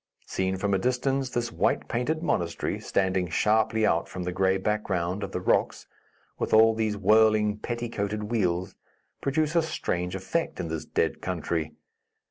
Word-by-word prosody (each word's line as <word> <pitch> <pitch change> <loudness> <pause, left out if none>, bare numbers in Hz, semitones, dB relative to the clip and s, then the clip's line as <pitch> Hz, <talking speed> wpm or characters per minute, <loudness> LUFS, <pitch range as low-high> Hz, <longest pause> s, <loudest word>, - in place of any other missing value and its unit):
Seen 95 0 -1
from 100 +1 0
a 95 - +2
distance 130 +3 0
this 120 -1 -2
white - - 0
painted 155 +7 -1
monastery, 85 - -1
standing 95 -1 0
sharply 110 +4 +2
out 85 - +1
from 90 - -5
the 90 - -2
gray 95 +1 +2
background 95 -2 -1
of 100 -1 -4
the 90 - -2
rocks, 90 - +1 0.5
with - - +1
all 110 +1 +7
these 110 -2 -1
whirling, 105 +1 +4
petticoated 105 -3 -3
wheels, 95 -4 0 0.5
produce 155 +3 0
a 170 - +5
strange 90 - -2
effect 160 - -2
in 85 - -3
this 80 -1 -4
dead - - -1
country. 80 -3 -2
105 Hz, 155 wpm, -27 LUFS, 90-120 Hz, 0.5 s, all